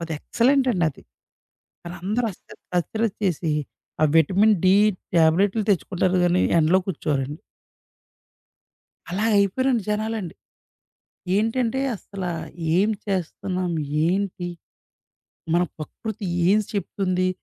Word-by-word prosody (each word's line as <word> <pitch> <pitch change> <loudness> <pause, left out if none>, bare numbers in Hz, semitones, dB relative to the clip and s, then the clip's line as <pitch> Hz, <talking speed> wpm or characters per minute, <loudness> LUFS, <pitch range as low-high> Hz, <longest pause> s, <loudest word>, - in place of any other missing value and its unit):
అదెక్సలెంటండి 230 - +1
అది. 140 - -11 0.8
అదందరూ 190 +7 -2
అస్తర - - -16 0.2
అశ్రద్ద 220 +4 -1
చేసి, 175 -3 0 0.5
ఆ - - +5
విటమిన్ 195 +7 +4
డి 185 +1 +6 0.4
ట్యాబ్లెట్లు 185 +6 +3
తెచ్చుకుంటారు 185 -1 +1
గానీ 175 +1 +3 0.2
ఎండలో 165 +4 +4
కూర్చోరండి. 145 -4 -2 1.7
అలా 200 +5 -1
అయిపోయారండి 230 +4 +2
జనాలండి. 215 -4 -2 1.0
ఏంటంటే, 230 +3 0
అసల 195 -1 -8 0.5
ఏం 200 +4 +3 0.2
చేస్తన్నాం, 185 -1 -2 0.3
ఏంటి, 185 -1 -1 1.1
మన 175 - +4 0.2
ప్రకృతి 200 +7 -6 0.2
ఏం 205 +2 +5
చెప్తుంది. 185 -2 -1
190 Hz, 90 wpm, -23 LUFS, 175-215 Hz, 1.7 s, డి